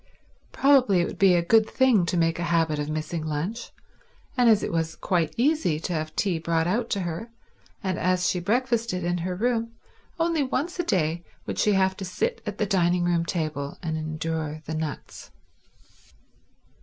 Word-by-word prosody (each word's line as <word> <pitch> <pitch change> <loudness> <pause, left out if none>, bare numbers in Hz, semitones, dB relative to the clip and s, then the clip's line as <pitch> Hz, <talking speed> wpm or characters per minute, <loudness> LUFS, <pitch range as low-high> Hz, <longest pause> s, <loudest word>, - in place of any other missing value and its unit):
Probably 255 -10 +4
it - - +1
would - - -7
be 190 -2 +6
a 170 - +2
good 220 +4 +4
thing 235 -9 +3
to 175 - 0
make 165 0 +1
a 170 - -1
habit 165 -3 +1
of 150 0 -3
missing 155 +1 -3
lunch, 160 +10 -3 0.7
and 245 -3 +4
as 215 -2 +4
it - - -2
was 165 -1 -1
quite 170 -4 0
easy 255 - +2
to 175 - -3
have 155 -1 -3
tea 185 -5 0
brought 165 0 0
out 225 +7 0
to 200 - -1
her, 175 +6 -4 0.5
and 185 -3 -1
as 180 0 +1
she 180 - 0
breakfasted 230 -1 0
in 175 0 0
her 180 +2 -3
room, 230 +2 -1 0.5
only 330 -2 +1
once 285 +6 -2
a - - +2
day 170 - 0 0.2
would - - -4
she 210 - +3
have 190 -1 +2
to - - -6
sit 460 - -2
at - - -4
the 210 - +1
dining 180 -3 +2
room 170 -1 +1
table 155 -5 -3
and 160 -2 -2
endure 155 0 -3
the 160 - -4
nuts. 155 -2 -5
180 Hz, 185 wpm, -25 LUFS, 160-225 Hz, 0.7 s, be